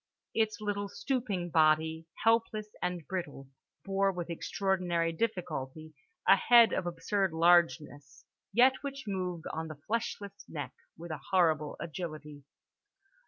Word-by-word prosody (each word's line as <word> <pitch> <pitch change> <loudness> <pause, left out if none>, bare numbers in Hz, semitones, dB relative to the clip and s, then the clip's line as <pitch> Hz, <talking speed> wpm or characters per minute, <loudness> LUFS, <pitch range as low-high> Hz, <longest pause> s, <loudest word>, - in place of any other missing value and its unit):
Its 220 -1 0
little 205 -1 -2
stooping 210 -12 -2
body, 160 +1 +3 0.2
helpless 225 -2 +2
and 180 -3 -2
brittle, 145 -7 -5 0.4
bore 195 0 +2
with 175 -2 -5
extraordinary 175 -1 0
difficulty 160 -6 -4 0.3
a - - +9
head 235 +3 +6
of 175 - -1
absurd 185 +2 -1
largeness, 155 -4 +2 0.3
yet 250 +5 +6
which 275 -1 -5
moved 180 -4 -3
on 160 +1 -3
the 155 -2 -9
fleshless 205 -3 -3
neck 145 -5 -5 0.2
with 170 +1 -8
a 155 - -5
horrible 160 -6 +2
agility. 155 -3 -7
175 Hz, 120 wpm, -31 LUFS, 160-200 Hz, 0.4 s, a